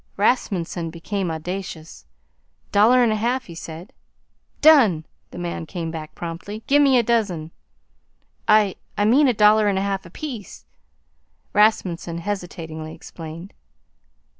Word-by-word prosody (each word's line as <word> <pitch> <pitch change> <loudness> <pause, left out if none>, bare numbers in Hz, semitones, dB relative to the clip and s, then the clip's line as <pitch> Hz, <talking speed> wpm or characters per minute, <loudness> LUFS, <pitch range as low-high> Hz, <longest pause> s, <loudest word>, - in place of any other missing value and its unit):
Rasmunsen 190 -6 0
became 180 +3 -3
audacious. 165 - -6 0.6
"Dollar 235 +5 +5
'n 230 - +3
a - - +1
half," 245 +4 -1
he 170 - -10
said. 165 +2 -9 0.7
"Done!" 235 - +6 0.2
the - - -11
man 170 -2 -4
came 165 -2 -4
back 155 -2 -8
promptly. 175 +6 -6
"Gimme 280 -2 +5
a 240 - +3
dozen." 200 -9 0 1.0
"I 210 -3 +4 0.2
I 205 - +2
mean 270 +7 +5
a 250 - +3
dollar 210 0 +5
'n 200 -2 +1
a 190 - 0
half 195 -1 -2
apiece," 225 - -8 0.9
Rasmunsen 185 -5 +2
hesitatingly 165 -4 -5
explained. 165 +3 -10
195 Hz, 125 wpm, -22 LUFS, 165-220 Hz, 1.0 s, Done